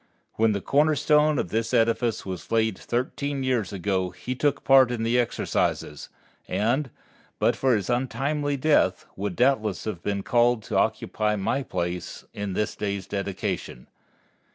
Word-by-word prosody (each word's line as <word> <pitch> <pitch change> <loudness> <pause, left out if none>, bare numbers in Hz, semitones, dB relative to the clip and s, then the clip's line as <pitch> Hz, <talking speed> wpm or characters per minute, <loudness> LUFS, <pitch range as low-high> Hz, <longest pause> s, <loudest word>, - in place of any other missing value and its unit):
When 110 -1 +2
the 100 - -2
corner 150 +6 +3
stone 150 +1 +3
of 90 - -1
this 115 +4 -1
edifice 115 0 +1
was 95 -2 -7
laid 110 -2 +2
thirteen 135 +5 -3
years 125 -6 0
ago 95 -1 -1
he 125 - -5
took 140 +2 0
part 135 -2 +6
in 120 -2 -2
the 115 +2 +2
exercises, 95 -9 -1 0.4
and, 130 +6 0 0.5
but - - +2
for 130 -3 +2
his 105 - -2
untimely 140 +4 -1
death, 130 -10 +2
would 100 -2 -3
doubtless 115 -5 +1
have 105 -6 -4
been 100 0 -2
called 120 -1 +2
to 110 - -5
occupy 110 +1 +1
my 105 +7 -1
place 90 -8 -4
in 100 -2 -4
this 105 +3 -1
day's 100 -2 -3
dedication. 100 -10 -4
115 Hz, 155 wpm, -25 LUFS, 100-130 Hz, 0.5 s, part